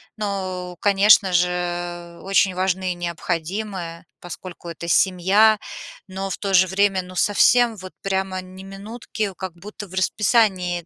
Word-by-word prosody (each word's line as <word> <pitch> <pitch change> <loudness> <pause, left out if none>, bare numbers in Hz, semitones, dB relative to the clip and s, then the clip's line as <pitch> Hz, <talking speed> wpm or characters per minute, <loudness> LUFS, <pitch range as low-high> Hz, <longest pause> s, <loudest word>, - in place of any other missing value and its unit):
ну, 185 -4 -4
конечно 200 -1 +5
же, 175 -1 -2
очень 195 -1 +2
важны 185 0 0
и - - -12
необходимы, 175 +1 -4 0.2
поскольку 175 0 -9
это 170 0 -7
семья, 195 +5 +4 0.5
но, 195 +1 -5
в - - -4
то 195 -1 -3
же 185 0 +6
время, 195 0 +1
ну, 185 0 -12
совсем 230 +5 +4
вот 185 -2 -10
прямо 190 -1 -2
ни 185 +1 -12
минутки, 205 +1 -5
как 185 -3 -6
будто 205 +3 -10
в 185 - -15
расписании 185 -3 +1
185 Hz, 140 wpm, -22 LUFS, 180-200 Hz, 0.5 s, же